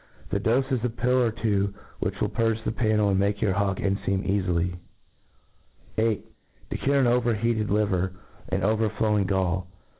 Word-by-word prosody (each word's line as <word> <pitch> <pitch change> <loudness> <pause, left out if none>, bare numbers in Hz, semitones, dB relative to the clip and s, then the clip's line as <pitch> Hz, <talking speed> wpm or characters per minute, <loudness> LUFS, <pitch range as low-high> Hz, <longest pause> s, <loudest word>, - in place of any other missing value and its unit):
The 100 - +1
dofe 125 +6 +1
is 125 -3 0
a 125 - +1
pill 125 +2 +1
or 120 - +3
two, 100 -3 0 0.2
which - - -2
will - - +1
purge 115 -1 +1
thepannel 110 -2 +1
^nd - - +2
make 100 +1 +1
your 100 -3 +1
hawk 100 0 0
cnfej^m 95 -1 -1
cafily. 90 -3 0 1.2
8. 110 -1 +1 0.5
To - - -1
cure 140 0 +2
an 135 - +4
over 120 -1 +2
he(ite4 110 0 0
Livfr^ 95 -3 +1 0.4
and 95 +1 -1
overflowing 105 -1 +1
Gall. 95 -1 0
105 Hz, 160 wpm, -26 LUFS, 95-115 Hz, 1.2 s, an